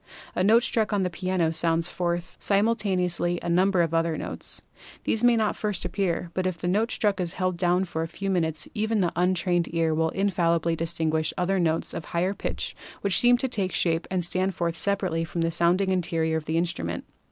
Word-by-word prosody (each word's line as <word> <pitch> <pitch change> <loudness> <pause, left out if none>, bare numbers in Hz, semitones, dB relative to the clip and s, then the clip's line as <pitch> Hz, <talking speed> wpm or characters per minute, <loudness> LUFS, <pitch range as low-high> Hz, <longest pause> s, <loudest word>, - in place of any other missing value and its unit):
A 180 - 0
note 225 +4 +5
struck 225 -2 +1
on 200 -2 +1
the 180 - -1
piano 180 -2 0
sounds 165 +1 +2
forth 175 -1 -3
simultaneously 195 -5 +1
a - - -2
number 180 +1 +3
of 165 -1 -2
other 165 -1 +1
notes. - - -6 0.4
These 225 - 0
may 245 -1 +6
not 220 -2 +2
at - - -5
first 210 -5 -2
appear, 175 -2 -1
but 185 0 0
if 185 -2 -3
the 175 - -4
note 210 +6 +1
struck 205 -3 +1
is 175 0 -1
held 185 -1 -1
down 180 +1 +2
for 160 -2 -4
a 165 - -2
few 195 +4 -4
minutes 160 -3 -1
even 215 0 0
the 175 -2 0
untrained 180 -1 +1
ear 165 -1 +2
will 160 +1 +1
infallibly 170 -4 +1
distin 165 -1 -1
guish 155 0 0
other 190 +1 +1
notes 165 -2 0
of 160 - -5
higher 180 +3 -1
pitch - - -4 0.3
which 200 -2 +3
seem 245 0 +6
to 265 - -1
take 195 -7 -2
shape 165 -1 0
and 185 -2 0
stand 185 +1 0
forth 170 -1 -1
separately 185 -3 0
from 165 +1 -3
the 165 0 +1
sounding 180 +4 +2
interior 165 -3 0
of 155 - -5
the 160 +1 -1
instrument. 90 - -2
175 Hz, 210 wpm, -26 LUFS, 165-195 Hz, 0.4 s, may